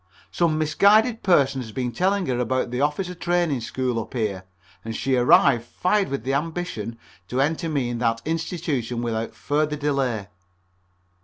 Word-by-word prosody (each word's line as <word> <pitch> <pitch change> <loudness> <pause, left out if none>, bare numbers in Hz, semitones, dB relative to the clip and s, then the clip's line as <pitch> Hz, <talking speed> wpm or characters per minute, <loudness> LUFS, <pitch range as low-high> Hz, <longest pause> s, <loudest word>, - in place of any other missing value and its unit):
Some 165 -3 +1
misguided 215 +9 +4
person 140 -7 +3
had 110 -3 -9
been 125 -2 -1
telling 190 - +1
her 125 -4 -1
about 125 0 0
the 125 +2 -1
Officer 175 +6 0
Training 175 -6 0
School 125 0 -2
up 115 - -7
here, 100 -6 -2 0.4
and 115 0 -5
she 130 +4 0
arrived 120 -1 +5
fired 190 - 0
with 140 - -3
the 135 +2 -1
ambition 150 - -3 0.3
to 125 - -2
enter 160 +4 0
me 140 -5 0
into 120 - -3
that 115 -1 +1
institution 150 -7 -2
without 115 -1 -3
further 150 +1 0
delay. 135 -8 -1
135 Hz, 160 wpm, -24 LUFS, 120-165 Hz, 0.4 s, arrived